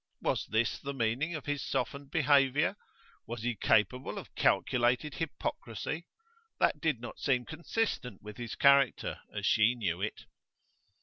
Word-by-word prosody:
Was - - 0
this 110 +2 +1
the 140 0 -5
meaning 130 +8 0
of 155 - -6
his 145 -1 -1
softened 140 +1 -2
behaviour? 145 +1 +3 0.5
Was 115 -1 -5
he 120 0 0
capable 110 +4 +1
of - - -8
calculated 125 +4 +2
hypocrisy? 150 +1 -4 0.5
That - - +2
did 155 -7 +1
not 120 - -8
seem 125 -3 +1
consistent 160 - -2
with 105 0 -9
his 120 -2 -5
character, 140 -2 +4
as - - -4
she 110 +3 +4
knew 95 -7 -2
it. 105 - -4
130 Hz, 140 wpm, -31 LUFS, 115-145 Hz, 0.5 s, character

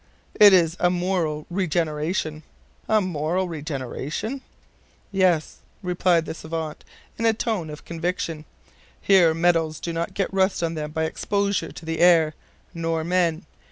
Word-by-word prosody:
"It 205 -1 +8
is 170 -3 +4
a 175 - +3
moral 175 -4 -1
regeneration." 160 -2 -1 0.5
"A 215 -1 +4
moral 180 +1 -1
regeneration?" 155 - -4 0.7
"Yes," 185 -5 +1 0.3
replied 180 -2 +2
the - - -4
SAVANT, 160 -1 -5 0.4
in 230 - 0
a 225 - +4
tone 210 -8 -2
of 150 +1 -9
conviction. 165 -2 -3 0.5
"Here 175 -5 +4
metals 165 -2 +1
do 170 - -4
not 165 +1 -3
get 195 -1 -1
rust 190 -2 +1
on 165 0 0
them 150 -2 -4
by 160 +1 -2
exposure 200 +5 -1
to - - -11
the 160 0 -3
air, 165 -3 +5 0.4
nor 165 -1 -1
men. 170 0 +1
170 Hz, 140 wpm, -24 LUFS, 160-185 Hz, 0.7 s, It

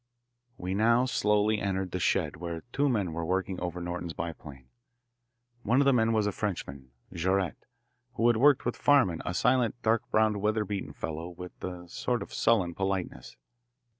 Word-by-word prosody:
We 90 +1 -3
now 115 +5 +3
slowly 105 -3 +2
entered 95 -2 -2
the 90 - -2
shed 85 -3 0
where 85 -1 -5
two 145 +1 +2
men 100 -9 0
were 85 +1 -3
working 95 +2 -1
over 90 0 -4
Norton's 85 -1 -4
biplane. 75 -6 -7 0.9
One 120 +3 +2
of 140 - +4
the 140 - +5
men 115 -2 +3
was 110 -2 +2
a 105 - +1
Frenchman, 70 - -4 0.2
Jaurette, 95 +1 -1 0.5
who 115 - 0
had 120 -1 +5
worked 140 +3 +4
with 120 - -1
Farman, 130 - +3
a 90 - -2
silent, 125 0 +2
dark 115 0 +3
browed, 110 -1 +2
weatherbeaten 105 -1 -1
fellow 80 +2 -5
with 90 +1 -11
a 90 -1 -6
sort 120 +7 -2
of - - -13
sullen 100 -7 +2
politeness. 95 -9 -3
95 Hz, 165 wpm, -29 LUFS, 85-110 Hz, 0.9 s, the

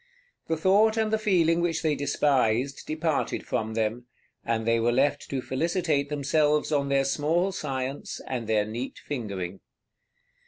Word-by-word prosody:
The 160 - 0
thought 205 +6 +4
and 220 -1 +1
the 220 - +2
feeling 170 -6 +3
which 170 -2 0
they 155 -2 +2
despised 135 -3 +1
departed 155 -1 -1
from 110 0 -2
them, 115 +2 -1 0.4
and 115 -1 -1
they 115 0 +3
were 115 +1 +2
left 135 +4 +1
to 135 -2 -2
felicitate 155 -1 0
themselves 150 +1 +1
on 140 -2 +1
their 135 0 +2
small 160 +7 +1
science 135 -5 -4
and 120 -4 -4
their 110 -2 +2
neat 115 +5 -5
fingering. 100 -9 -5
140 Hz, 150 wpm, -27 LUFS, 120-160 Hz, 0.4 s, thought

